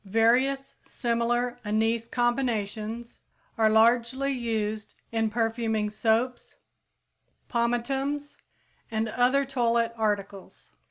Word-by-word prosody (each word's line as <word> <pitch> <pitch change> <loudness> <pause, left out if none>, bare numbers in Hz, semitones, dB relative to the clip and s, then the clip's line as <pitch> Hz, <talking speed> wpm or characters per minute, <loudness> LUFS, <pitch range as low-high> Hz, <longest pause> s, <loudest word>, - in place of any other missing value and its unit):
Various 245 +7 +2
similar 240 0 -1
anise 225 +2 0
combinations 235 -2 -2 0.4
are 220 -1 +3
largely 235 +5 +3
used 220 -4 -3 0.2
in 225 -1 +1
perfuming 225 -1 -1
soaps, 230 +3 0 0.9
pomatums 270 +5 -1 0.5
and 220 0 -1
other 255 +4 +2
toilet 235 -3 +1
articles. 205 -3 -3
235 Hz, 85 wpm, -27 LUFS, 220-245 Hz, 0.9 s, are